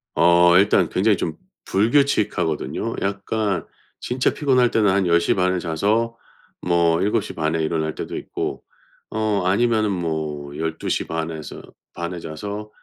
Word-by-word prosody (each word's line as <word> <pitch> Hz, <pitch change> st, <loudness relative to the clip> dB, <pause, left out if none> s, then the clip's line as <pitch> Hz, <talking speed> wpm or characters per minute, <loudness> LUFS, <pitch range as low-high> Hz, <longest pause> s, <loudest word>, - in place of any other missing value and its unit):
어 85 Hz, +1 st, +5 dB
일단 95 Hz, -4 st, +4 dB
굉장히 100 Hz, +1 st, +2 dB
좀 80 Hz, -1 st, -3 dB, 0.3 s
불규칙하거든요. 110 Hz, -, +1 dB
약간 100 Hz, -1 st, -1 dB, 0.3 s
진짜 125 Hz, +1 st, 0 dB
피곤할 130 Hz, -4 st, +3 dB
때는 105 Hz, -4 st, +3 dB
한 95 Hz, -1 st, +1 dB
10 85 Hz, 0 st, +4 dB
시 85 Hz, -, +1 dB
반에 90 Hz, 0 st, +1 dB
자서 105 Hz, +8 st, 0 dB, 0.5 s
뭐 85 Hz, -1 st, +2 dB
7 105 Hz, +2 st, +1 dB
시 -, -, -7 dB
반에 80 Hz, 0 st, -1 dB
일어날 80 Hz, -1 st, -1 dB
때도 -, -, -5 dB
있고 -, -, -4 dB, 0.5 s
어 110 Hz, -3 st, 0 dB
아니면은 110 Hz, +1 st, +2 dB
뭐 80 Hz, -5 st, -3 dB
12 80 Hz, 0 st, -3 dB
시 -, -, -1 dB
반에서 80 Hz, -2 st, -5 dB, 0.3 s
반에 85 Hz, +1 st, -5 dB
자서 100 Hz, +7 st, -6 dB
90 Hz, 255 characters per minute, -22 LUFS, 80-105 Hz, 0.5 s, 어